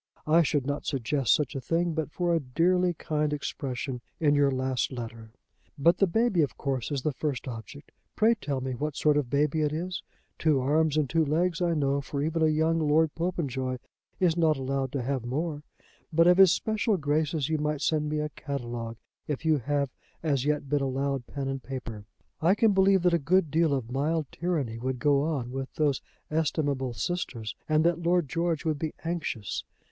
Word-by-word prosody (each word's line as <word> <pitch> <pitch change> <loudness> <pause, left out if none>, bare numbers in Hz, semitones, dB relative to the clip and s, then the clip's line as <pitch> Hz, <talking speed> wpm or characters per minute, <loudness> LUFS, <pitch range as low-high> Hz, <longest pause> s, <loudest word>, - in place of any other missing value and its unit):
I 160 +2 +5
should 145 -3 +1
not 145 +1 -3
suggest 135 -1 0
such 150 -4 +2
a 135 - -3
thing 170 +5 0
but 160 -1 -2
for 175 0 0
a 165 - +3
dearly 175 +6 +2
kind 150 -1 -1
expression 135 -3 -4 0.2
in 150 -3 +3
your 145 -1 +4
last 130 -1 -1
letter. 115 -3 -7 0.5
"But 170 +5 +4
the 195 - +5
baby 220 -1 +2
of 145 - -1
course 135 -4 -2
is 140 -3 -2
the 150 - 0
first 140 -3 -3
object. 120 +4 -8 0.2
Pray 220 +2 +4
tell 145 - -3
me 130 0 -3
what 150 +3 -3
sort 150 -1 +3
of 145 -2 +2
a - - -18
baby 150 +3 +1
it 150 -1 +1
is. 180 +4 -3 0.4
Two 155 -4 +3
arms 150 +3 +2
and 150 -2 +2
two 165 +4 +2
legs, 165 +4 0
I 170 -1 +2
know, 140 -1 +1
for 140 +1 -5
even 165 +2 -1
a 160 - +5
young 160 +2 +2
Lord 155 0 +3
Popenjoy 140 -7 -2 0.4
is 175 -3 +3
not 160 -3 +3
allowed 135 0 -2
to 135 -3 -1
have 130 -1 -1
more; 145 +5 -2 0.5
but 165 +1 +4
of 180 +1 +5
his 190 -3 +9
special 215 -1 +1
graces 150 -1 0
you 155 -1 0
might 150 -1 -1
send 150 -1 +1
me 155 - -1
a 150 - -2
catalogue, 120 -6 -5 0.3
if 150 +1 -3
you 155 -2 +3
have 140 +1 -1 0.3
as 140 -4 +1
yet 150 -1 0
been 145 +1 +1
allowed 135 -1 -1
pen 140 -2 -4
and 135 0 -3
paper. 120 -5 -6 0.4
I 175 +5 +4
can 220 0 +4
believe 190 -1 +4
that 180 -1 +4
a 170 - +3
good 165 +1 +2
deal 160 0 +3
of 130 -4 -2
mild 150 +2 -1
tyranny 150 -10 -2
would 130 +1 -2
go 140 +1 +3
on 140 -6 -2
with 135 0 -4
those 145 -4 +1 0.3
estimable 145 -5 0
sisters, 115 - -3
and 155 0 +4
that 170 0 +2
Lord 175 -2 +2
George 170 0 -1
would 155 -2 0
be 155 0 -3
anxious. 160 - -3
150 Hz, 200 wpm, -28 LUFS, 135-165 Hz, 0.5 s, his